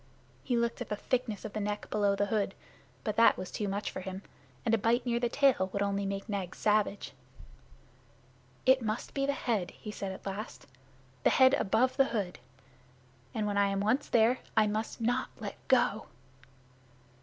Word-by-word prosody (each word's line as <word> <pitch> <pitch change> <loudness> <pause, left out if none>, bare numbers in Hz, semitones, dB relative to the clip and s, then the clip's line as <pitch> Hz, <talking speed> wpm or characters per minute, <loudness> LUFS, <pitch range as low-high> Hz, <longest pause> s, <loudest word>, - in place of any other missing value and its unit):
He 245 -3 0
looked 235 +1 -1
at 245 - -5
the 210 - -1
thickness 230 -1 -2
of 215 - -6
the 215 - -2
neck 210 0 -3
below 205 -1 +2
the 205 - +1
hood, 200 -1 -1 0.5
but 210 - -2
that 230 - +6
was 185 - -6
too 210 - -2
much 200 +2 -2
for - - -5
him; 190 +1 -6 0.4
and 225 - +2
a - - +5
bite 235 +4 +2
near 235 -1 +1
the 240 0 0
tail 245 -8 +3
would 200 +1 0
only 200 0 -1
make 195 +1 -4
Nag 195 -4 -3
savage. 210 -1 +1 1.5
"It 260 0 +5
must 220 0 -3
be 275 0 0
the 280 - +2
head"' 225 -9 -1
he 210 - -9
said 195 -2 -4
at 190 - -10
last; 200 +4 -6 0.6
"the - - +4
head 260 0 +6
above 245 +3 +2
the 270 - +6
hood. 205 -8 -3 1.0
And, 215 - 0
when 205 -1 0
I 200 - +4
am 195 0 -1
once 220 +8 +1
there, 235 +2 +4 0.2
I 215 - +6
must 215 +2 -3
not 245 +3 0
let 205 -3 -5
go." 240 -4 +2
215 Hz, 190 wpm, -31 LUFS, 200-240 Hz, 1.5 s, that